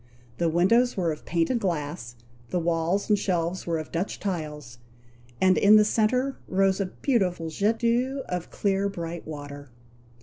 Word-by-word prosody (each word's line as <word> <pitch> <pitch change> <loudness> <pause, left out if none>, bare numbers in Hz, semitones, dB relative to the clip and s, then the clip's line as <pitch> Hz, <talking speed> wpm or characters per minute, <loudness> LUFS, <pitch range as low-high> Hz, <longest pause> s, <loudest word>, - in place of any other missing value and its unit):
The 170 - +2
windows 230 +10 +3
were 175 -3 +1
of 155 - -8
painted 170 +9 +1
glass; 150 - -3 0.3
the - - -1
walls 170 +3 0
and 210 -2 +3
shelves 175 -2 -1
were 165 -1 0
of 155 -1 -6
Dutch 175 +4 -3
tiles, 150 -10 -5 0.6
and 185 0 +4
in 205 +1 +7
the 215 0 +6
centre 250 +5 +1
rose 195 +1 +2
a 195 - -1
beautiful 180 - -1
jet 210 +7 +1
d'eau 250 +4 0
of 180 -2 -4
clear 200 0 0
bright 170 -3 -6
water. 145 -2 -8
180 Hz, 160 wpm, -26 LUFS, 165-210 Hz, 0.6 s, in